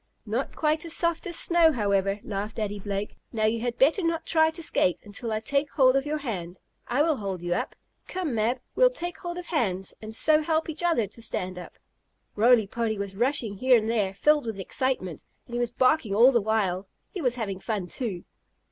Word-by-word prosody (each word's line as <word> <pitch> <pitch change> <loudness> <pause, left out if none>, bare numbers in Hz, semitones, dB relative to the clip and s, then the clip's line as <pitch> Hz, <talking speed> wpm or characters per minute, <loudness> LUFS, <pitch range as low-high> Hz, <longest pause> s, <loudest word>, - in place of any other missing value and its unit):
"No 230 +5 -1
quite 310 0 -1
as 335 -1 -1
soft 335 +2 0
as 345 - 0
snow, 340 -2 +4
however," 200 -3 +1
laughed 205 +1 -4
Daddy 205 -2 -3
Blake. 200 +1 -4
"Now 220 -2 0
you 225 +1 +1
had 240 0 -2
better 300 - +4
not 330 -1 -1
try 315 -1 +4
to 325 +1 -7
skate 180 - +1
until 210 +3 -6
I 215 - 0
take 280 +6 0
hold 260 -3 +5
of 275 +1 +1
your 305 +1 -1
hand. 190 - -5 0.3
I 260 +5 +2
will 315 -3 +1
hold 195 -4 -4
you 175 0 0
up. - - -3 0.3
Come, 360 -7 -3
Mab, 230 +3 +1 0.2
well - - +6
take 350 -9 -5
hold 345 0 -5
of 360 - -6
hands 195 - -1
and 220 0 -7
so 310 +5 +4
help 320 +1 0
each 315 +1 -4
other 335 -10 +2
to 210 +4 -11
stand 185 -5 -3
up." 180 - -11 0.6
Roly 230 0 +5
Poly 220 +1 -2
was 200 -1 -5
rushing 235 -3 0
here 255 +3 +5
and 220 -1 -1
there, 200 -4 0
filled 295 +4 +3
with 220 -3 -4
excitement, 190 - -2 0.2
and 240 - -13
he 240 - -1
was 240 -1 0
barking 255 -3 +2
all 240 +5 +7
the 235 -3 +3
while. 200 -3 0 0.2
He 380 - -5
was 250 -4 +1
having 200 -6 -3
fun 205 -2 -3
too. 190 -2 -4
235 Hz, 215 wpm, -26 LUFS, 200-300 Hz, 0.6 s, all